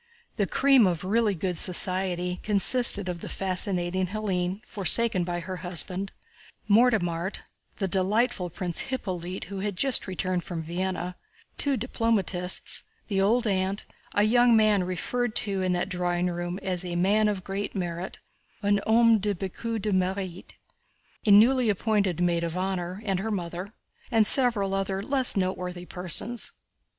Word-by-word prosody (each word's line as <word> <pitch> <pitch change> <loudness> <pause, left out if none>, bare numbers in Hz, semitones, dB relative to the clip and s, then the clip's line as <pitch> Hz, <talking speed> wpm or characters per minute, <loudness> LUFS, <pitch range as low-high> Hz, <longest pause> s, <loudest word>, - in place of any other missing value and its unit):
The 200 -3 0
"cream 265 -3 +4
of 175 -2 -2
really 210 +1 +1
good 180 0 -2
society" 180 -1 +3
consisted 205 -1 +4
of 175 -1 -4
the - - -8
fascinating 185 -1 -1
Hélène, 190 -1 -3
forsaken 210 0 +3
by 175 0 -3
her 185 +2 -6
husband, 180 +2 -3 0.6
Mortemart, 200 -6 +1 0.3
the 195 - -2
delightful 195 +1 0
Prince 180 +6 -2
Hippolyte 185 -8 -4
who 195 +1 -7
had 200 0 -3
just 265 +3 +2
returned 185 -1 -2
from 165 -3 -6
Vienna, 180 +1 -4 0.4
two 280 -2 0
diplomatists, 210 -6 +1 0.3
the 195 -2 0
old 230 +5 +2
aunt, 195 -1 -1 0.3
a 205 - +3
young 240 +2 +4
man 215 -3 +3
referred 215 +6 -3
to 195 -2 0
in 185 -1 0
that 175 - -1
drawing 180 -1 -1
room 175 +1 -4
as 180 -2 -1
"a 175 -1 -5
man 205 +5 +2
of 200 -3 -2
great 200 +3 -5
merit" 175 0 -4 0.5
(un 205 0 +2
homme 230 0 +4
de 205 0 -1
beaucoup 220 +5 -5
de 210 +1 -2
mérite), 185 -1 -2 0.7
a - - +4
newly 235 +4 +5
appointed 200 -3 0
maid 170 -1 +1
of 170 +1 -3
honor 185 +1 -3
and 195 -3 -1
her 220 +3 -3
mother, 180 -1 -5 0.4
and 225 -2 +3
several 220 -6 +5
other 195 0 -2
less 265 -3 +2
noteworthy 180 -1 -3
persons. 185 +7 -4
190 Hz, 150 wpm, -26 LUFS, 180-215 Hz, 0.7 s, newly